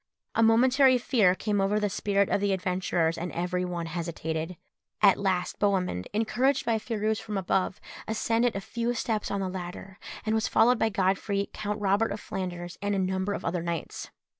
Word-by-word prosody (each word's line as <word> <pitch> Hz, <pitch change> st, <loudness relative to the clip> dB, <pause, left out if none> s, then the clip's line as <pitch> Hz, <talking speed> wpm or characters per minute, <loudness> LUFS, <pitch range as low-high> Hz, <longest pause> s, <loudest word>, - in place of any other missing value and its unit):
A -, -, +2 dB
momentary 255 Hz, +4 st, +5 dB
fear 220 Hz, -7 st, +3 dB
came 205 Hz, 0 st, 0 dB
over 200 Hz, +2 st, +2 dB
the 210 Hz, -, +1 dB
spirits 200 Hz, 0 st, 0 dB
of 200 Hz, -, +2 dB
the 200 Hz, -1 st, +2 dB
adventurers, 180 Hz, -3 st, 0 dB
and 175 Hz, +1 st, -4 dB
every 180 Hz, +1 st, -1 dB
one 175 Hz, -2 st, -3 dB
hesitated. 165 Hz, 0 st, -4 dB, 0.4 s
At 200 Hz, -2 st, +5 dB
last 185 Hz, -2 st, -1 dB
Bohemund, 185 Hz, -, 0 dB
encouraged 245 Hz, +6 st, +1 dB
by 225 Hz, -1 st, +1 dB
Phirouz 215 Hz, -1 st, -1 dB
from 215 Hz, -2 st, -4 dB
above, 190 Hz, 0 st, 0 dB, 0.3 s
ascended 225 Hz, +1 st, +1 dB
a 195 Hz, -, -2 dB
few 235 Hz, +3 st, -2 dB
steps 220 Hz, -2 st, -1 dB
on 200 Hz, 0 st, -1 dB
the 190 Hz, -, -1 dB
ladder, 185 Hz, +1 st, -7 dB, 0.3 s
and 220 Hz, -, +1 dB
was 220 Hz, 0 st, +1 dB
followed 245 Hz, +1 st, +4 dB
by 225 Hz, -, +2 dB
Godfrey, 195 Hz, +1 st, 0 dB
Count 210 Hz, 0 st, -3 dB
Robert 205 Hz, +2 st, +2 dB
of 205 Hz, -, -4 dB
Flanders, 175 Hz, -3 st, -5 dB
and 205 Hz, 0 st, 0 dB
a -, -, 0 dB
number 190 Hz, +1 st, 0 dB
of -, -, -5 dB
other 170 Hz, +1 st, -1 dB
knights. 170 Hz, -1 st, -4 dB
200 Hz, 185 wpm, -28 LUFS, 180-220 Hz, 0.4 s, momentary